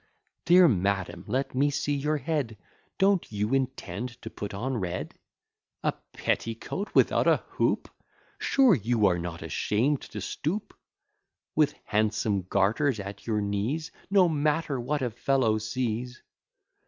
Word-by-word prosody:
Dear 175 +1 +7
madam, 95 - 0
let 135 +2 -1
me 140 +3 +3
see 145 +1 -1
your 150 +2 0
head: 135 -6 -2 0.4
Don't 195 - +2
you 105 +3 -1
intend 125 -3 -2
to 110 - -6
put 105 - -6
on 120 +6 -2
red? 90 -3 -3 0.7
A - - +3 0.2
petticoat 115 - -2
without - - +4
a - - +4
hoop! - - 0 0.5
Sure, 265 -5 +5
you 115 - +2
are 90 -3 +3
not 85 -1 -5
ashamed 115 - 0
to - - -7
stoop! 190 +8 -3 0.8
With 150 -1 +3
handsome 105 -2 0
garters 110 +6 +2
at 100 +2 -8
your 105 -2 +1
knees, 105 +11 -2 0.2
No 195 -2 +5
matter 150 -2 0
what 140 +3 -1
a 125 - -1
fellow 120 -2 +1
sees. 120 +2 -3
120 Hz, 135 wpm, -28 LUFS, 105-145 Hz, 0.8 s, Dear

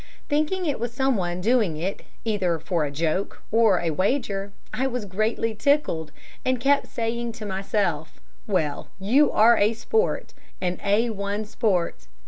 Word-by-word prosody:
Thinking 310 +5 +1
it 290 -4 -1
was 240 0 -2
someone 210 -9 0
doing 215 -6 +2
it 185 +5 -3 0.2
either 190 -6 +1
for 160 0 -1
a - - -3
joke 160 +6 -2
or 220 -5 +4
a 170 -1 0
wager, 200 - 0 0.2
I 265 +1 0
was 250 -4 -3
greatly 215 +3 0
tickled, 215 - +1 0.3
and 255 -1 +1
kept 280 +3 +3
saying 235 0 -2
to 220 -1 -7
myself, 190 -5 -1 0.3
'Well, 160 -8 -1
you 260 +10 +4
are 230 +2 +6
a 210 +3 +4
sport, 445 - -1 0.3
an 180 -1 -1
A1 205 0 0
sport.' 185 - -1
210 Hz, 145 wpm, -25 LUFS, 180-240 Hz, 0.3 s, are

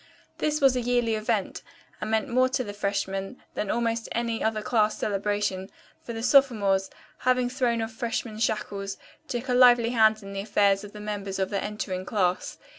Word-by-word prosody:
This 305 0 0
was 270 -2 +5
a 250 - 0
yearly 240 -1 +1
event, 215 0 -1 0.4
and 215 - -3
meant 220 -1 +1
more 255 +2 +3
to 255 0 -1
the 205 -3 -6
freshmen 195 +1 -3
than 210 - -3
almost 230 -1 -1
any 235 -1 -1
other 220 -1 0
class 215 -3 +2
celebration, 200 -2 -1 0.3
for - - -7
the 225 0 -5
sophomores, 215 -8 +3 0.3
having 250 -1 +1
thrown 240 -3 0
off 225 - -5
freshman 225 -1 -3
shackles, 200 -3 -2 0.3
took 240 +1 -4
a 250 - +1
lively 245 -2 +6
hand 220 -2 +4
in 195 0 -8
the 195 - -3
affairs 200 -1 +2
of 205 - -10
the 210 - -9
members 205 -2 -4
of 190 0 -1
the 200 - -1
entering 200 -3 -4
class. 185 -3 -1
220 Hz, 185 wpm, -26 LUFS, 200-240 Hz, 0.4 s, lively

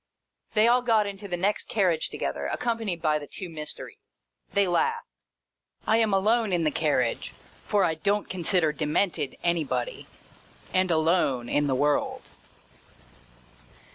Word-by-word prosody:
They 215 +1 +5
all 245 +1 +4
got 225 -4 +3
into 200 0 -6
the 175 -2 -2
next 200 +4 -1
carriage 180 -7 +1
together, - - -3
accompanied 225 -8 -2
by 155 -1 +2
the 145 - -9
two 185 -3 -7
Mysteries. 155 -2 -9 0.3
They 200 -1 +3
laughed. 460 - 0 0.8
I 220 - +3
am 225 -2 +2
alone 215 +3 +2
in 175 -2 +1
the 155 - +2
carriage 140 -6 0 0.4
(for 205 -2 +3
I 165 - +2
don't 200 +6 0
consider 175 -2 +1
Demented 150 0 -1
anybody) 150 -8 -1 0.7
and 185 0 +2
alone 160 -7 +2
in 145 0 +1
the 135 - +1
world. 145 +2 0
175 Hz, 140 wpm, -26 LUFS, 150-205 Hz, 0.8 s, They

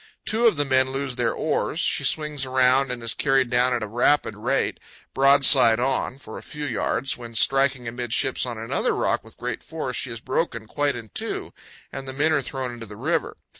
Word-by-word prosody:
Two 230 +2 +3
of 220 - +3
the 145 0 +2
men 130 -1 +2
lose 135 -1 -3
their - - 0
oars; - - -2
she - - +2
swings 150 -3 +1
around 130 0 +3
and 120 -1 -6
is 115 - +2
carried 135 -3 +1
down 125 +1 +3
at 120 -3 -1
a - - -4
rapid 120 +3 +2
rate, 125 +6 -1 0.3
broadside 135 -4 +6
on, 130 0 -1
for 110 -5 -10
a - - -13
few 150 -1 -7
yards, 130 +1 -1
when, 115 -1 -10
striking 135 0 +2
amidships 120 +2 -1
on 120 -2 -3
another 115 +1 -1
rock - - 0
with 110 - -17
great 120 -2 -4
force, 155 -6 -5
she 130 - -3
is 115 -1 -6
broken 125 -2 -2
quite 145 +5 -1
in 115 -3 -9
two - - -4 0.4
and 135 0 -7
the 130 - -5
men 150 +4 +1
are 145 - +2
thrown 130 -1 -5
into 115 -1 -9
the 105 0 -11
river. - - -1
130 Hz, 205 wpm, -24 LUFS, 120-135 Hz, 0.4 s, broadside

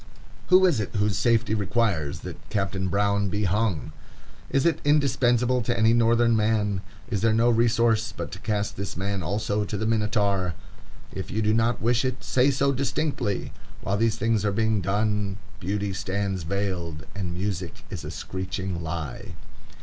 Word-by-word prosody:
Who 185 +1 +6
is 170 -11 +3
it 105 - -4
whose 105 -1 +1
safety 115 +2 +2
requires 100 - 0
that - - -9
Captain 95 -2 -1
Brown 100 +1 +1
be 105 +2 -1
hung? 95 - 0 0.6
Is 135 - +1
it 170 - +2
indispensable 125 -4 +3
to 120 +1 -1
any 110 0 +4
Northern 115 0 +4
man? 105 -3 +1 0.3
Is 100 -4 0
there 110 0 +3
no 120 +2 +4
resource 115 -1 +2
but - - -6
to - - -7
cast 105 -2 -2
these 100 -2 -5
men 100 +1 -2
also 105 +4 -1
to 105 +1 -3
the 110 - -2
Minotaur? 105 -5 +1 0.6
If - - -5
you 110 +3 -1
do 105 +1 +3
not 115 0 +1
wish 120 +1 +3
it, 130 -1 -2
say 130 +2 +3
so 140 0 +2
distinctly. 140 -5 -1 0.3
While 100 +1 -1
these 115 0 +2
things 115 -1 +1
are 105 - +2
being 110 0 +1
done, 100 +1 0 0.2
beauty 100 +2 -2
stands 95 0 -2
veiled 85 -3 -3
and 90 -4 -4
music 90 -2 -4
is - - -5
a - - -5
screeching 95 -1 -4
lie. 80 -4 -5
105 Hz, 165 wpm, -25 LUFS, 95-115 Hz, 0.6 s, Who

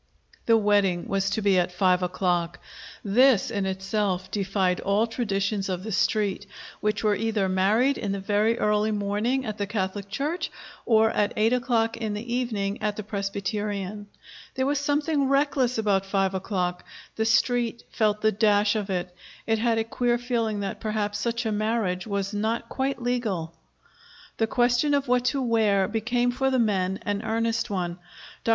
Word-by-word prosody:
The 230 -1 +6
wedding 205 -4 +2
was 195 0 0
to 215 +2 -2
be 195 -2 +4
at 180 0 0
five 180 0 +2
o'clock. 175 -1 -1 0.5
This, 230 +1 +4
in 200 -3 -1
itself, 190 -1 -2
defied 195 -2 0
all 200 +3 +2
traditions 200 -4 -2
of 185 -1 -3
the 220 - -5
Street, 205 0 0 0.3
which 210 +1 -1
was 210 -1 +2
either 220 -3 0
married 210 +9 +2
in 205 -4 -2
the 200 - -2
very 210 +3 +1
early 210 0 +2
morning 210 +5 -1
at 215 -1 -5
the 200 - -1
Catholic 200 -1 -3
church 290 - -2 0.4
or 220 -1 +4
at 205 - 0
eight 220 +3 +3
o'clock 235 -3 +1
in 220 -3 -3
the 235 +3 -5
evening 215 -5 -2
at 210 -1 -1
the 215 - -5
Presbyterian. 205 0 -3 0.5
There 260 - 0
was 285 +1 +1
something 290 -1 +1
reckless 275 -3 +2
about 200 -3 +1
five 195 -1 +1
o'clock. 180 -2 -2 0.3
The 220 - 0
Street 235 +1 +1
felt 210 -1 +1
the 215 - +3
dash 205 0 +3
of 210 -2 -2
it. 180 -1 -2 0.3
It 225 -1 +1
had 230 0 +2
a 225 - +2
queer 240 +1 0
feeling 230 -4 -1
that 195 -1 -4
perhaps 210 -1 -2
such 235 +2 -2
a 220 - 0
marriage 215 -3 -1
was 200 -1 -2
not 220 +3 -2
quite 265 -2 -2
legal. 215 -10 -2 0.8
The 225 - +1
question 245 +5 +2
of 280 -1 -1
what 250 0 +2
to 270 +1 +1
wear 215 -5 +2
became, 240 +3 0
for 265 +2 0
the 260 - +1
men, 195 -5 +1
an 205 0 -2
earnest 225 0 -1
one. 180 -3 -3 0.4
Dr. - - -2
215 Hz, 170 wpm, -26 LUFS, 195-235 Hz, 0.8 s, The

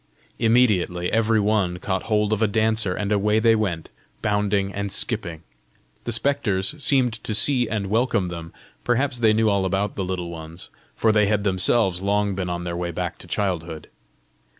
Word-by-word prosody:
Immediately 105 -7 +2
every 115 0 +2
one 100 -4 +1
caught 95 +1 -2
hold 105 0 +2
of 110 - -2
a 110 - +4
dancer, 110 -2 +1
and 105 0 -3
away 105 +1 +2
they 115 0 +4
went, 90 -7 -3 0.3
bounding 105 -2 0
and 100 -1 -4
skipping. 90 -10 -1 0.6
The 120 - -2
spectres 110 -5 +1
seemed 125 -5 +1
to 110 - -1
see 125 +1 +3
and 105 -3 -2
welcome 105 -3 0
them: 85 -1 -7 0.3
perhaps 125 +1 0
they 110 -2 +4
knew 110 +1 +2
all 100 -2 +2
about 95 +2 -1
the 95 - -2
Little 90 -2 -4
Ones, 80 +1 -8 0.2
for 110 - +2
they 105 -1 +3
had 105 -1 +1
themselves 95 -1 +1
long 100 0 0
been 90 -1 -3
on 85 0 -3
their 85 0 -4
way 85 0 -3
back 85 - -4
to - - -12
childhood! 85 -6 -3
105 Hz, 175 wpm, -23 LUFS, 90-110 Hz, 0.6 s, a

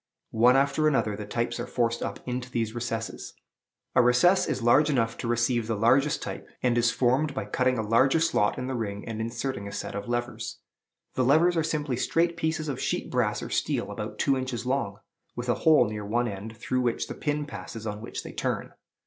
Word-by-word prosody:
One 120 +3 +5
after 140 +3 +3
another 135 -8 +1
the 105 0 -7
types 115 +3 -2
are 120 - -3
forced 115 -1 0
up - - -4
into 125 0 -3
these 115 -3 -2
recesses. 115 -1 -4 0.6
A - - +6
recess 175 +11 +4
is 130 - -2
large 135 +6 +5
enough 115 -5 +1
to 120 - -3
receive 120 -1 +1
the 115 - 0
largest 135 +8 +3
type, - - -6 0.2
and 125 -2 +3
is 120 0 +3
formed 135 +5 +1
by 135 - -2
cutting 130 0 +1
a 110 -1 -2
larger 130 +7 +4
slot 160 -11 +2
in 125 - -3
the 130 - -3
ring, 105 -4 -4
and 110 -1 -4
inserting 115 -2 -3
a - - -6
set - - -5
of 100 +3 -5
levers. 120 0 -3 0.6
The 130 - +1
levers 160 +7 +4
are 165 - +2
simply 150 -5 -1
straight 170 +6 +1
pieces 160 -1 -1
of 140 -4 -3
sheet - - -2
brass - - 0
or - - -7
steel - - -1
about - - -5
two 135 - +2
inches 130 -2 -3
long, 125 -6 -1 0.4
with 120 +1 -4
a - - +5 0.2
hole 150 -6 +7
near 105 0 -5
one 120 +4 0
end, 105 +2 -7
through 130 +4 -1
which 120 -2 0
the - - -5
pin 150 -1 -2
passes 115 -3 -8
on 105 0 -4
which 115 - -6
they - - -8
turn. - - -2
120 Hz, 215 wpm, -27 LUFS, 115-140 Hz, 0.6 s, hole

